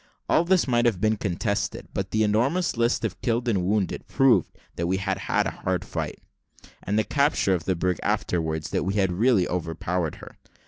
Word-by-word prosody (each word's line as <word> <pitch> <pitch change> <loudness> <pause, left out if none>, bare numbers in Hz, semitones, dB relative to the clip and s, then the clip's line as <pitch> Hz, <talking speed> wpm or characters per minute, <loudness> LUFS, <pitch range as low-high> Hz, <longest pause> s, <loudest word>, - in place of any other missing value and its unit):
All 160 - +4
this 185 -2 +3
might 120 -1 +2
have 105 -6 +1
been 110 +2 +2
contested; 100 0 -2
but 95 -1 -3
the 110 +2 +1
enormous 130 - +1
list 115 0 +1
of 95 -3 -5
killed 120 +1 0
and 100 -6 +1
wounded 100 0 -1
proved 135 -3 +3 0.2
that 85 - -2
we 95 +2 +1
had 95 0 -2
had - - +2
a - - -1
hard - - -2
fight, - - -4 0.6
and 105 +2 -1
the 110 - +3
capture 140 -7 +2
of 85 -3 -2
the 95 - +1
brig 90 0 -1
afterwards, 80 -3 -1
that - - 0
we 95 +2 -2
had 95 -3 +2
really 100 0 +3
overpowered 85 -1 -2
her. - - -13
100 Hz, 195 wpm, -25 LUFS, 90-120 Hz, 0.6 s, All